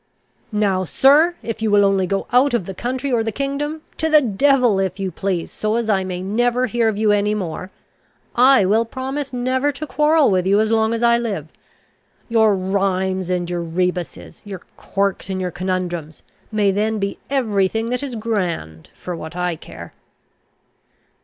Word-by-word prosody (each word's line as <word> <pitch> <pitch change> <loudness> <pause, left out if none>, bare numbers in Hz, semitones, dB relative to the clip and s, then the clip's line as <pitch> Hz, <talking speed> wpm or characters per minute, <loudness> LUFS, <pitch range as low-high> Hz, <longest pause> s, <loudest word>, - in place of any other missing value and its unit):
Now, 200 -3 +1
sir, 295 - +4
if 225 -1 -5
you 220 - +1
will 205 -1 +5
only 195 -2 +2
go 195 +1 -1
out 255 +1 +4
of 195 - -1
the 195 - -6
county 255 +7 -3
or 235 -2 +2
the 225 - -2
kingdom, 285 +5 -3
to 320 - 0
the 310 -1 +7
devil 250 -2 +2
if 190 0 -2
you 190 -1 -2
please, 185 -3 -3
so 215 +1 -2
as 230 -2 0
I 190 -2 +1
may 185 -1 -4
never 240 +5 +1
hear 235 -1 0
of 210 - -3
you 215 0 +2
any 205 +1 +1
more, 185 -2 -5 0.7
I 255 -3 +6
will 215 +4 +3
promise 265 +4 -5
never 255 +3 0
to 295 +3 -6
quarrel 300 -3 +3
with 185 -1 +1
you 200 +2 +4
as 220 0 +1
long 220 0 +2
as 230 - -3
I 235 0 +4
live. 195 -10 -4 0.8
Your 220 -3 +4
rhymes 190 -1 -1
and 180 -1 -1
your 175 0 -3
rebusses, 170 - -3
your 195 -3 -8
quirks 195 -1 -2
and 190 -1 -2
your 180 -1 -2
conundrums, 175 -3 -4 0.3
may 210 -2 +2
then 215 +3 0
be 200 -1 -3
every 220 -8 +1
thing 225 +4 -3
that 250 - -1
is 275 -4 -5
grand 180 - -3
for 180 - -6
what 160 +1 -8
I 180 -1 -1
care." 85 - -11
205 Hz, 185 wpm, -20 LUFS, 185-245 Hz, 0.8 s, the